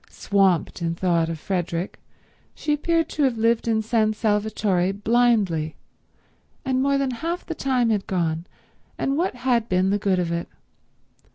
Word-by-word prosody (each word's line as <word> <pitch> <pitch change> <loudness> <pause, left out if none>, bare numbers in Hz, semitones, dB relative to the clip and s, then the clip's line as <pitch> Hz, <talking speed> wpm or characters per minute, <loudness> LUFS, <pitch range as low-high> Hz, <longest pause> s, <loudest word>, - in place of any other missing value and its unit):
Swamped 195 -4 +1
in 165 0 -1
thought 170 -2 +1
of 165 - -3
Frederick, 175 0 -3 0.6
she 300 - -1
appeared 330 +2 +1
to 300 - -4
have 260 -5 +2
lived 230 +1 +1
in 220 -1 +1
San 215 -1 +2
Salvatore 210 -4 0
blindly, 205 -8 +1 0.9
and 260 -1 +1
more 280 +1 +2
than 275 -1 0
half 335 +8 -4
the 330 - -4
time 255 -6 +1
had 205 -3 -1
gone, 165 -2 -1 0.5
and 275 - 0
what 340 -1 0
had 245 -2 0
been 185 +1 +2
the 205 - +1
good 195 -2 +1
of 175 -2 -1
it? 170 0 -2
215 Hz, 160 wpm, -23 LUFS, 180-250 Hz, 0.9 s, have